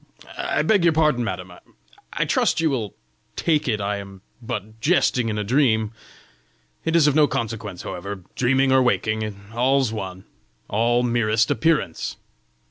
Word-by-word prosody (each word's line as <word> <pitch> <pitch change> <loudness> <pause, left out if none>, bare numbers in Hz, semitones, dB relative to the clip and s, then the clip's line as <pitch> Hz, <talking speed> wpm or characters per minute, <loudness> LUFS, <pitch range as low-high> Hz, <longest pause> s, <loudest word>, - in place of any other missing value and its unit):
I - - -1
beg 205 -5 +3
your 170 -2 +4
pardon, 150 -6 +2
madam! 90 -5 -5 0.6
I - - -1
trust - - +1
you 160 -2 +2
will 110 -7 -3 0.4
take 155 -4 +1
it 110 -4 0
I 100 0 -1
am 100 -1 -10 0.2
but 110 -2 -6
jesting 125 -6 +2
in 105 - -2
a 105 - -1
dream! 110 -2 +2 0.9
It 165 - 0
is 165 -3 +5
of 150 - +4
no 150 0 +5
consequence, 110 -7 -4
however; 100 +1 -6
dreaming 135 +2 +2
or 130 0 +5
waking, 110 -4 0 0.2
all's 130 0 +2
one 95 -3 -6 0.4
all 120 +3 +1
merest 115 -2 +2
appearance! 150 - 0
115 Hz, 150 wpm, -23 LUFS, 105-135 Hz, 0.9 s, is